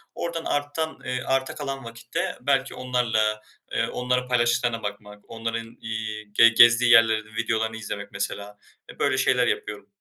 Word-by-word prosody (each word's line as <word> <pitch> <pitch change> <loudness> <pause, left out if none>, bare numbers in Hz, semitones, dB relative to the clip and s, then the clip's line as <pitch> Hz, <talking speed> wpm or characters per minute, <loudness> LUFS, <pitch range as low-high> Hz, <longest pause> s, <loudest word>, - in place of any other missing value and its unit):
oradan 170 -1 -4
artan 145 +2 -2
eee, 125 0 -2
arta 135 0 -1
kalan 135 -2 -5
vakitte 115 0 -4
belki - - 0
onlarla, 110 -4 0 0.3
eee, - - 0
onların 125 0 -1
paylaştıklarına 120 -1 +1
bakmak, 105 0 -7
onların, 115 0 -5
iii, 110 -2 -5
ge 115 +2 +7
gezdiği 120 +1 +6
yerlerin 110 -2 +4
videolarını 110 -1 -1
izlemek, 100 -2 -6
mesela. 100 +1 -5 0.3
E, - - -19
böyle - - +1
şeyler - - +2
yapıyorum. - - -3
115 Hz, 145 wpm, -25 LUFS, 110-125 Hz, 0.3 s, ge